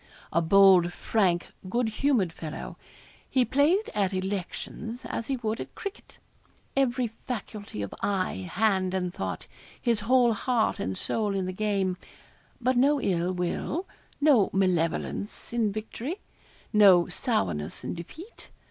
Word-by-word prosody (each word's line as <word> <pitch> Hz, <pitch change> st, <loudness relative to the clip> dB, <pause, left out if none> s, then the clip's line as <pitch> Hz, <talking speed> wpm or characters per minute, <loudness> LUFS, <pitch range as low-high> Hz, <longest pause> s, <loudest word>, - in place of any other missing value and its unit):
A 170 Hz, -, +3 dB
bold, 185 Hz, 0 st, +6 dB
frank, 185 Hz, -6 st, +1 dB, 0.2 s
good 235 Hz, +4 st, +1 dB
humoured 220 Hz, -, +1 dB
fellow 155 Hz, -2 st, -7 dB, 0.5 s
he 255 Hz, -2 st, +3 dB
played 315 Hz, -, +2 dB
at 200 Hz, -2 st, +1 dB
elections 200 Hz, +5 st, -4 dB
as 230 Hz, -, -4 dB
he 270 Hz, -, -1 dB
would 220 Hz, -2 st, -2 dB
at -, -, -9 dB
cricket. 400 Hz, +1 st, -8 dB, 0.6 s
Every 255 Hz, -2 st, +2 dB, 0.2 s
faculty 205 Hz, -, -5 dB
of 100 Hz, -, -6 dB
eye, 185 Hz, -, -1 dB
hand, 190 Hz, -3 st, +1 dB
and 180 Hz, -1 st, -1 dB
thought 90 Hz, -3 st, -4 dB, 0.3 s
his 235 Hz, -3 st, +1 dB
whole 240 Hz, +2 st, +4 dB
heart 230 Hz, +1 st, 0 dB
and 95 Hz, 0 st, -2 dB
soul 210 Hz, -3 st, -1 dB
in 190 Hz, -1 st, -1 dB
the 185 Hz, -, -3 dB
game. 195 Hz, -2 st, 0 dB, 0.6 s
But 255 Hz, +1 st, +1 dB
no 285 Hz, +3 st, +4 dB
ill 180 Hz, -5 st, 0 dB
will 185 Hz, -, -2 dB, 0.3 s
no 285 Hz, -9 st, +5 dB
malevolence 185 Hz, +3 st, -1 dB
in 225 Hz, -3 st, +1 dB
victory 225 Hz, -, -4 dB, 0.6 s
no 195 Hz, -5 st, +7 dB
sourness 150 Hz, -, -2 dB
in -, -, -3 dB
defeat. 315 Hz, -, -10 dB
205 Hz, 135 wpm, -27 LUFS, 185-245 Hz, 0.6 s, no